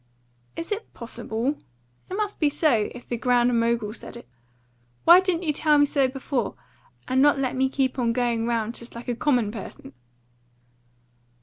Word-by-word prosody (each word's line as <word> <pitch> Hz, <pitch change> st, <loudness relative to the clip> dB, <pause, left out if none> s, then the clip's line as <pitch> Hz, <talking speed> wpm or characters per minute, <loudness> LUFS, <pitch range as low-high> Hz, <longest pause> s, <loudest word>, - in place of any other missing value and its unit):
"Is 330 Hz, -, -6 dB
it 420 Hz, +2 st, -4 dB
possible? 235 Hz, +3 st, -3 dB, 0.5 s
It 370 Hz, -, -4 dB
must 415 Hz, 0 st, -2 dB
be 300 Hz, -, +3 dB
so, 285 Hz, -8 st, +2 dB
if 245 Hz, -, -11 dB
the 240 Hz, -, -3 dB
Grand 245 Hz, 0 st, +2 dB
Mogul 230 Hz, -2 st, 0 dB
said 235 Hz, -, -10 dB
it. 235 Hz, -, -13 dB, 0.8 s
Why 345 Hz, +2 st, +9 dB
didn't 370 Hz, -2 st, -1 dB
you 305 Hz, -3 st, 0 dB
tell 300 Hz, 0 st, +3 dB
me 290 Hz, -, +5 dB
so 275 Hz, -2 st, +2 dB
before, 260 Hz, -2 st, -3 dB, 0.5 s
and 260 Hz, +1 st, +2 dB
not 290 Hz, 0 st, +5 dB
let 265 Hz, -2 st, -1 dB
me 265 Hz, +1 st, +1 dB
keep 265 Hz, -1 st, -1 dB
on 235 Hz, -2 st, +1 dB
going 235 Hz, -1 st, 0 dB
round 230 Hz, -1 st, -1 dB
just 235 Hz, 0 st, -8 dB
like 235 Hz, -, -9 dB
a 245 Hz, -, -1 dB
common 245 Hz, -5 st, +1 dB
person?" 200 Hz, -, -9 dB
255 Hz, 175 wpm, -25 LUFS, 235-290 Hz, 0.8 s, Why